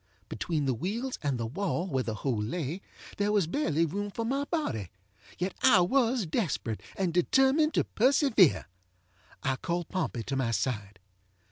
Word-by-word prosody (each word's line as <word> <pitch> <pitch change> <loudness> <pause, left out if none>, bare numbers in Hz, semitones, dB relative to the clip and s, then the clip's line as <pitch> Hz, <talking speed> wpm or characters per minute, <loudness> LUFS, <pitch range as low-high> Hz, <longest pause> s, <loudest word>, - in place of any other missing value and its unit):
Between 150 +7 -2
the 130 - +2
wheels 220 - -3
and 140 -4 0
the 115 - -2
wall 175 - -2
where 135 -9 -1
the 110 -2 -3
hole 115 -1 -1
lay 155 - -3 0.4
there 205 +1 +1
was 205 -4 +3
barely 165 - +1
room 205 +6 -3
for 225 +3 -4
my 275 +4 0
bodyŌĆöyet 105 - -5
I 190 - +6
was 240 +3 +2
desperate, 155 - -2
and 185 -4 -1
determined 270 - +3
to - - +3
persevere. 245 - +3 0.8
I 130 -1 0
called 170 +2 -3
Pompey 155 - -2
to 140 - -3
my 130 -3 0
side. 105 -2 -2
175 Hz, 155 wpm, -29 LUFS, -, 0.8 s, I